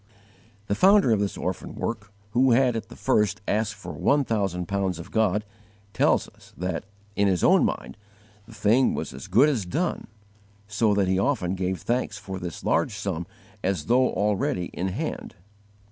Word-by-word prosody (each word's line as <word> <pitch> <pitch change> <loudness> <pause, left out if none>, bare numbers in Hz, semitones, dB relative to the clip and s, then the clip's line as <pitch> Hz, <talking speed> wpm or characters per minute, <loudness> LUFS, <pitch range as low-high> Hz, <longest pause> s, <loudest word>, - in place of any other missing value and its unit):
The 100 - -1
founder 195 - +5
of 110 - +3
this 100 -1 -2
orphan - - -4
work, 105 -3 -4 0.2
who 125 +2 +4
had 125 -1 +3
at 115 - -5
the - - -11
first 105 -1 +1
asked 105 -1 0
for 100 - -8
one 145 0 +2
thousand 95 -7 -1
pounds 95 -3 -1
of 85 - -10
God, 105 -1 +1 0.5
tells - - +2
us - - -20
that, 90 +2 -3 0.3
in 100 - +3
his 95 -3 +1
own - - +5
mind, 65 +2 -3 0.5
the 115 - -13
thing 110 +5 +3
was - - -4
as 70 +8 -9
good 115 +10 +5
as 130 -9 0
done, 165 - -2 0.6
so 105 0 +1
that 100 -2 +2
he 95 0 +2
often 100 -7 0
gave 95 -1 -2
thanks 120 -3 -1
for 95 -1 -6
this 90 -3 -6
large - - +1
sum 85 +2 -3 0.4
as 90 -6 -1
though 125 +4 +3
already 95 -3 0
in 95 - -2
hand. 95 - -4
100 Hz, 175 wpm, -25 LUFS, 95-115 Hz, 0.6 s, founder